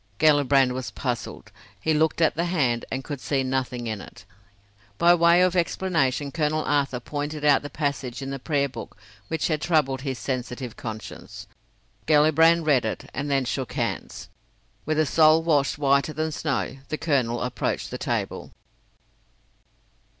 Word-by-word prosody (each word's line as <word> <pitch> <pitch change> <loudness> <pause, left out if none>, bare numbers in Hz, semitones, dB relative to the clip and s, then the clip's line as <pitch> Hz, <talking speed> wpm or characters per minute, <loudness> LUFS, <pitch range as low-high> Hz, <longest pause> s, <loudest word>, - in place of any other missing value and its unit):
Gellibrand 140 -3 +4
was 130 0 -4
puzzled; 125 -4 -5 0.3
he 160 - +1
looked 160 +2 +1
at 160 - +4
the 170 +2 -1
hand 135 -10 0
and 130 0 -3
could 145 -3 -6
see 135 -2 0
nothing 130 -2 -2
in 110 -3 -4
it. - - -13 0.7
By 170 +6 +6
way 170 +1 +5
of 185 0 +2
explanation 160 -6 0
Colonel 155 0 0
Arthur 140 -3 0
pointed 145 +3 -4
out 145 -2 +5
the 145 - -7
passage 140 -5 -3
in 135 - -5
the 135 - -4
prayer 140 0 0
book 120 -5 -9 0.3
which 160 - -1
had 155 -2 -1
troubled 140 -6 +1
his 135 -2 -3
sensitive 125 +1 -4
conscience. 110 -2 -8 0.6
Gellibrand 160 +2 +5
read 140 -5 +3
it, 110 - -5
and 145 +2 -3
then 135 -2 +1
shook 130 0 -3
hands. - - -4 0.6
With 155 0 0
a 155 - +3
soul 155 +2 +5
washed 145 -5 +2
whiter 140 +1 +2
than 155 +1 -2
snow, 140 -3 -2
the 155 - -2
colonel 130 -8 0
approached 125 - -2
the - - -5
table. - - -3
145 Hz, 155 wpm, -25 LUFS, 130-155 Hz, 0.7 s, By